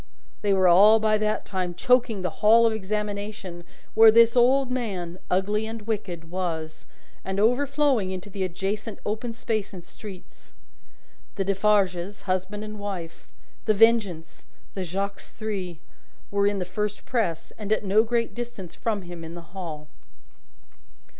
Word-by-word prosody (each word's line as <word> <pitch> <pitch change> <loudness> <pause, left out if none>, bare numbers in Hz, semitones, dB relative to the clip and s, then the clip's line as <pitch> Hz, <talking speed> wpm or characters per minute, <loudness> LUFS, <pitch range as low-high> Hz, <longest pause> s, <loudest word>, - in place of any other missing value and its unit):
They 205 - +1
were 190 -1 +4
all 205 +5 +7
by 215 -1 +2
that 215 0 -1
time 185 -3 -3
choking 240 -3 +2
the 180 -3 -4
Hall 225 +2 +6
of 225 - +3
Examination 205 -3 -4 0.3
where 225 0 +8
this 230 +1 +6
old 255 +2 +4
man, 185 -8 -3
ugly 205 +4 +1
and 225 -1 -6
wicked, 185 -7 -4
was, 165 -4 -4 0.4
and 190 +1 -3
overflowing 265 -1 +2
into 185 +1 -5
the 195 -1 -4
adjacent 195 +4 -3
open 220 +3 -2
space 220 -3 -3
and 175 - -9
streets. 190 +1 -12 0.8
The 195 - -1
Defarges, 195 -1 +1
husband 190 +2 -2
and 215 0 -7
wife, 185 -5 -6 0.3
The 215 -2 +3
Vengeance, 200 - +2 0.3
and 190 - -2
Jacques 195 +3 -3
Three, 195 -6 -5 0.5
were 200 0 +2
in 205 0 +1
the 185 - -2
first 210 +3 -3
press, 170 -10 -2
and 210 -1 -5
at 215 -1 +1
no 205 +3 +4
great 235 0 -1
distance 235 -8 -7
from 210 -4 -2
him 175 -1 -8
in 165 +1 -8
the 170 0 -12
Hall. 160 -6 -6
205 Hz, 150 wpm, -25 LUFS, 185-220 Hz, 0.8 s, where